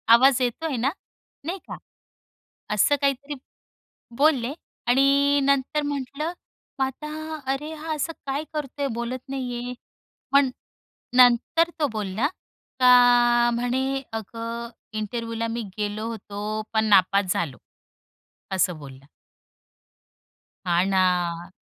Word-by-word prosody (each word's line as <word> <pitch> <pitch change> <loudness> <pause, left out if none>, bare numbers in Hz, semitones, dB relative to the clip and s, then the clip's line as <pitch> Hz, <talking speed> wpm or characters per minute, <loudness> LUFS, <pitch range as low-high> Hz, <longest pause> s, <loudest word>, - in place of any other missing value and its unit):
आवाज 260 +1 +5
येतोय 265 +4 -1
ना?" 265 +5 +1 0.5
नाही 365 +3 -3
का? - - -6 1.0
असं 250 +8 +4
काहीतरी 280 +1 0 0.8
बोलले 275 -4 +3 0.3
आणि 280 +3 +4
नंतर 280 +2 +1
म्हटलं 285 +3 -3 0.5
मग 265 - +3
आता 310 +3 -6
"अरे, 295 +4 -4
हा 315 +1 -5
असं 315 +2 -2
काय 280 +3 -2
करतोय? 285 -2 -3
बोलत 235 +2 -3
नाहीये." 250 -2 -4 0.6
पण 280 -2 +5 0.7
नंतर 250 +7 +5
तो 295 - +4
बोलला 215 +5 -1 0.5
का 245 -1 +6
म्हणे 260 +3 -1
"अगं, 230 +2 -5 0.2
इंटरव्ह्युला 230 +1 -3
मी 230 +1 -3 0.2
गेलो 210 +1 -2
होतो, 215 -1 -4
पण 220 0 +2
नापास 195 -2 +4
झालो" 170 -10 -2 1.0
असं 180 -2 +1
बोलला. 135 -1 -12 1.6
हा 175 0 +3
ना, 180 -2 +1
245 Hz, 105 wpm, -24 LUFS, 215-280 Hz, 1.6 s, का